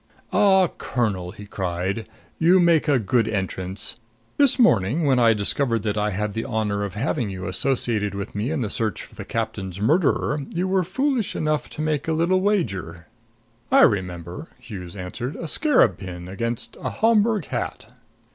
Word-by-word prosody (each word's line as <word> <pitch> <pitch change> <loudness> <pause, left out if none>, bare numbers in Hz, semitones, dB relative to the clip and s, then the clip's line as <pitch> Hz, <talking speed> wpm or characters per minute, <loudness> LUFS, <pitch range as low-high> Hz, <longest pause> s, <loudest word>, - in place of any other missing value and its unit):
"Ah, 190 -2 +5
Colonel," 100 -8 -1
he 105 +2 -10
cried, 95 +2 -3 0.3
"you 175 +3 +5
make 170 -3 +4
a 145 -2 +4
good 115 0 +1
entrance! 95 -2 -3 0.4
This 280 -3 +5
morning, 145 - +3
when 130 -3 +3
I 115 -2 +5
discovered 115 +2 0
that 105 -1 -1
I 105 0 0
had 105 +1 -2
the 115 - -2
honor 105 -4 -1
of 100 -2 -5
having 120 0 -1
you 95 -1 -6
associated 110 -7 0
with 100 +3 -5
me 105 +5 -2
in 155 -3 -1
the 110 - -1
search 110 -5 -2
for - - -15
the - - -7
captain's 95 -1 -4
murderer, 150 - +2
you 180 +2 -1
were 190 0 +2
foolish 255 - -1
enough 155 -1 -1
to 155 - -5
make 155 -2 -1
a 160 - +1
little 175 +4 +2
wager 95 - -1 0.3
" - - -38 0.3
"I - - +6
remember," 90 - 0
Hughes 100 -7 -8
answered. 100 +8 -5
"A 165 - -5
scarab 155 - +3
pin 90 -2 -7
against 115 +5 -4
a - - -2
Homburg 220 -4 +2
hat." - - -4
115 Hz, 175 wpm, -23 LUFS, 100-160 Hz, 0.4 s, I